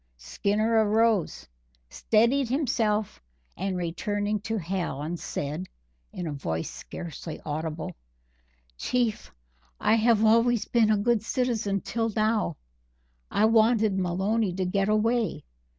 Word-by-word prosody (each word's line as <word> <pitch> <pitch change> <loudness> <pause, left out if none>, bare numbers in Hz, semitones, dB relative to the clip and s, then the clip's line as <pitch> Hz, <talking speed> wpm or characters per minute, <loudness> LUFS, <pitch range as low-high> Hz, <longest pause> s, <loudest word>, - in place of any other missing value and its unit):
Skinner 210 - +1
arose, 215 -3 +1 0.4
steadied 235 - +2
himself, 225 -6 0 0.3
and 180 -3 -3
turning 205 +1 -1
to 225 +3 -3
Hallen 170 -4 -3
said, 155 +2 -4 0.4
in 180 - -5
a 160 - -3
voice 80 - -3
scarcely 165 -1 -8
audible: 155 +1 -4 0.8
"Chief, 240 - -1 0.5
I - - +3
have 225 -1 +3
always 230 0 +4
been 230 -3 +3
a 215 - +4
good 225 +1 +2
citizen 220 -4 -1
till 230 -1 -1
now. 215 -6 +1 0.7
I 215 - +2
wanted 220 -2 +3
Maloney 190 +4 0
to 185 0 -1
get 195 +2 0
away. 225 +2 +1
210 Hz, 115 wpm, -27 LUFS, 180-225 Hz, 0.8 s, always